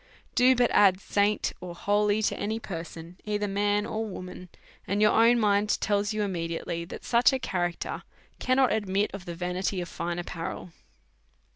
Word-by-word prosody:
Do 255 +1 +5
but 245 -1 +2
add 190 -2 +5
saint 205 +1 0
or 175 -1 -7
holy 205 +3 +1
to - - +1
any 220 +2 -2
person, 170 -2 -8
either 210 -1 -1
man 205 +1 +1
or 220 +1 -3
wo 200 -4 -6
man, 180 0 -10 0.4
and 200 +2 0
your 210 0 +5
own 230 +2 +5
mind 205 -1 +2
tells 205 0 0
you 215 -1 -1
immediately 170 -2 -3
that - - -9
such 240 +2 +4
a 265 - 0
character 175 -7 -3 0.4
cannot 255 -1 +3
admit 205 -1 0
of 195 -2 -7
the 170 - -6
vanity 180 +2 -2
of 175 - -4
fine 170 +1 -4
ap 175 - -4
parel. 175 +1 -6
200 Hz, 175 wpm, -27 LUFS, 180-210 Hz, 0.4 s, Do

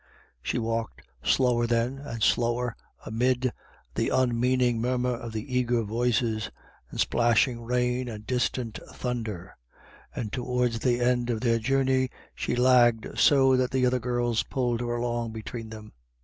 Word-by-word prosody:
She - - -2
walked 115 -1 -3 0.2
slower 120 -3 +2
then 120 +3 0
and 115 -6 -5
slower 120 0 +1 0.3
amid 125 +2 +1 0.4
the - - 0
unmean 125 0 +2
ing 120 -2 +2
murmur 125 +1 0
of 115 -1 -7
eager 125 0 0
voices, 115 0 0 0.4
and - - -8
splashing 120 +1 +2
rain 125 +1 0
and 105 -2 -8
distant 120 -5 -1
thunder, 110 -7 -4 0.6
and 105 -3 -4
towards 125 -2 0
the 120 +1 +1
end 120 0 +1
of 115 -2 -1
their 115 -2 +2
journey 130 +1 +1 0.2
she - - -2
lagged 120 -2 +3
so 135 -2 +5
that 130 -1 +1
the 130 -1 +1
other 125 0 +2
girls 120 -1 0
pulled 120 -3 -1
her 120 0 -2
along 120 -1 -2
between 110 +1 -6
them. 110 -1 -10
120 Hz, 145 wpm, -27 LUFS, 115-125 Hz, 0.6 s, so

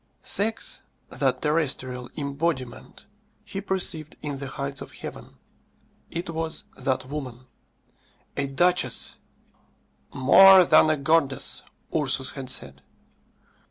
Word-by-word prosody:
Sex, 220 +3 0 0.3
that - - -1
terrestrial 130 -5 -1
embodiment, 140 -3 -4 0.4
he 195 -1 -5
perceived 175 -6 +1
in 145 -2 -4
the 140 - -5
heights 140 +1 -4
of - - -10
heaven. - - -10 0.7
It 170 0 -5
was 160 0 -2
that 130 -1 -2
woman. 130 -3 -7 0.9
A 140 -1 -1
duchess! 175 +6 +1 0.9
"More 190 +8 +7
than 155 -1 +5
a 155 - +2
goddess," 140 -1 +1 0.3
Ursus 135 -4 0
had 130 -2 -8
said. 70 - -3
140 Hz, 105 wpm, -25 LUFS, 130-165 Hz, 0.9 s, More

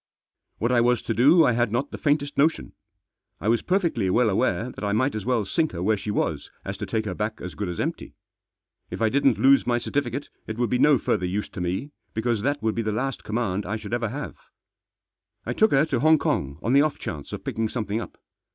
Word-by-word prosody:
What 115 +3 0
I 120 -1 +4
was 120 0 +2
to 115 - -1
do 145 - +6
I - - +4
had 120 -1 +1
not 135 +5 -1
the - - -5
faintest 145 -1 0
notion. 155 +3 +1 0.7
I - - -4
was 115 +1 +3
perfectly 170 - 0
well 115 +3 +3
aware 115 +2 0
that - - -9
I 100 0 0
might 130 +7 +1
as 110 -2 -4
well 120 -5 +1
sink 160 - 0
her 85 0 -4
where 110 +3 +3
she 105 +1 -6
was 105 - -1 0.2
as - - -4
to - - -4
take 110 -1 -1
her 95 - -2
back 105 +3 -3
as 90 - -7
good 105 -3 -4
as 85 - -5
empty. - - -4 0.7
If - - -6
I 110 -1 +3
didn't 135 -1 +3
lose 135 -1 +5
my 120 -1 +2
certificate 135 +2 -2 0.2
it 110 - -5
would 120 -3 0
be 125 - +2
no 150 -2 +6
further 90 -5 0
use 100 +3 -3
to 95 - -7
me, 95 +12 -2 0.2
because 110 -1 0
that 145 +2 -1
would 110 -1 +1
be 115 - -1
the 110 -1 -1
last 130 +4 -2
command 105 -3 -2
that - - -7
I 105 - -1
should 110 - -8
ever 120 -2 0
have. 145 +6 -6 1.1
I - - -2
took 220 - +4
her 140 -2 +4
to 135 -6 -1
Hong 155 +3 +5
Kong 70 - -1
on 120 - +1
the 140 - +7
off 155 -1 0
chance 75 -4 -6
of - - -6
picking 110 -1 -2
something 110 -2 -2
up. - - -9
115 Hz, 245 wpm, -25 LUFS, 105-140 Hz, 1.1 s, the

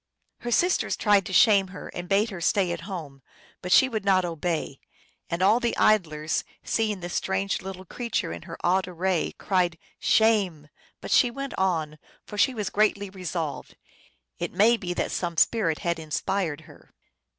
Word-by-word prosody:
Her 240 - -5
sisters 355 +10 +2
tried 205 -3 +3
to - - -6
shame 195 +1 +5
her, 185 0 -9
and 175 0 -7
bade 205 +3 +2
her 180 -3 -7
stay 185 +1 +2
at 170 -1 -4
home, 150 -8 -7 0.4
but 180 - -5
she 260 - +7
would 220 -5 -3
not 190 -2 +3
obey; 165 -4 -3 0.5
and 170 +2 -1
all 210 +5 +5
the 240 -2 -1
idlers, 155 -7 +2 0.2
seeing 215 -4 -1
this 175 0 -6
strange 190 +1 -1
little 190 0 -8
creature 230 - -3
in 85 - -8
her - - -7
odd 185 +1 +2
array, 180 0 -1
cried, 180 -4 0 0.2
" - - -56 0.2
Shame! 195 -9 +2 0.2
" - - -34
But - - -7
she 250 - +5
went 275 +3 -6
on, 160 -5 -1 0.3
for 210 - -9
she 255 +5 +2
was 210 -3 -3
greatly 205 -2 +1
resolved; 175 -5 -5 0.6
it - - -3
may 215 +6 +5
be 180 -6 -4
that - - -1
some 170 -2 -3
spirit 170 -6 +2
had 170 -1 0
inspired 160 +1 -2
her. - - -18
185 Hz, 180 wpm, -26 LUFS, 170-210 Hz, 0.6 s, she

